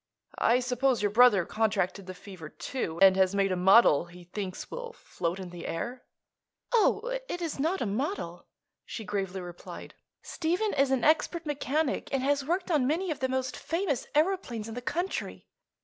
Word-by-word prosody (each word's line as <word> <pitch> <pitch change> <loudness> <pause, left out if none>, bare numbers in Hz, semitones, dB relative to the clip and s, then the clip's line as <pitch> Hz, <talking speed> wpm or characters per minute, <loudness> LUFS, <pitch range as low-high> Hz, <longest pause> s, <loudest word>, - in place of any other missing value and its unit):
I 245 +2 +4
suppose 250 -1 +1
your 205 - +2
brother 215 -5 +6
contracted 200 -3 -1
the 185 - -7
fever, 180 -6 -10
too, 170 - -4
and 190 -1 +8
has 190 0 +3
made 195 -1 +2
a - - +1
model 180 -3 +6
he 175 +1 -14
thinks 185 +1 -6
will 485 -1 -6
float 175 - -4
in 185 -2 -7
the 175 -1 -7
air." 245 +9 -4 0.7
"Oh, - - +2
it 355 - -3
is 330 -5 -4
not 330 +7 0
a - - +1
model," 265 - -3 0.4
she 220 - -7
gravely 195 -1 -3
replied. 175 -1 -9 0.3
"Stephen 355 +6 -1
is 275 0 +2
an 265 -2 +1
expert 320 +2 +2
mechanic 295 0 -1
and 270 -1 0
has 280 0 +1
worked 355 +5 -1
on 285 -6 +3
many 335 +5 0
of 300 - -4
the 260 - 0
most 260 0 -2
famous 325 -4 -2
aëroplanes 300 - 0
in 225 - -7
the 245 - -5
country. 350 +9 -3
250 Hz, 180 wpm, -29 LUFS, 195-310 Hz, 0.7 s, and